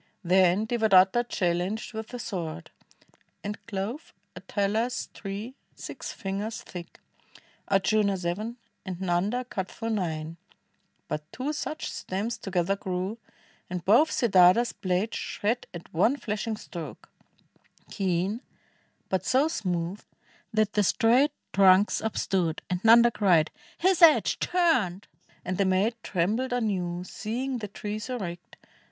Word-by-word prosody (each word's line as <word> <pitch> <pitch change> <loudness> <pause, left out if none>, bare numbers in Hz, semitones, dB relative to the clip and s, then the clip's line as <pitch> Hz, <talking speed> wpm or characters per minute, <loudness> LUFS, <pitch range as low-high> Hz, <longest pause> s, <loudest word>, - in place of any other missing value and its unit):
Then 185 +3 +4
Devadatta 220 -1 +4
challenged 185 +6 -1
with 220 0 -5
the 245 - -7
sword, 175 -8 -5 0.7
And 205 +1 -5
clove 210 +9 -5 0.2
a - - -8
Talas 220 +5 -1
tree 205 +5 -6 0.2
six - - -7
fingers 205 +1 -4
thick; 175 -1 -10 0.7
Ardjuna 200 0 +2
seven; 200 +7 -3 0.3
and 185 -3 -5
Xanda 190 +7 0
cut 190 -6 -4
through 225 0 -4
nine; 165 -5 -2 0.7
But 150 0 -5
two 275 +4 -3
such 310 +1 -4
stems 205 +5 -3
together 195 -1 0
grew, 190 +3 -3 0.5
and 180 -1 -4
both 240 +11 +5
Siddartha's 210 +1 +5
blade 185 +3 -1
shred 230 +4 -2
at 170 -1 -10
one 220 - +3
flashing 215 -2 -3
stroke, 170 -6 -9 0.8
Keen, 190 +3 -1 0.7
but 190 -1 -1
so 265 +8 +3
smooth 180 - -2 0.5
that 215 -1 +1
the 210 - +3
straight 240 +8 +4 0.2
trunks 195 +1 +5
upstood, 185 -6 -1
And 180 0 -1
Xanda 235 +2 +7
cried. 175 -6 +3 0.3
'"His 370 0 +2
edge 325 -3 +6
turned 255 - +1
I" - - -36
and 185 +1 -3
the 200 - +4
maid 190 +5 +2
Trembled 220 +9 0
anew, 185 -7 -1
seeing 245 +7 -3
the 210 - -5
trees 210 +3 -5
erect. 180 -9 -6
200 Hz, 125 wpm, -27 LUFS, 180-230 Hz, 0.8 s, Xanda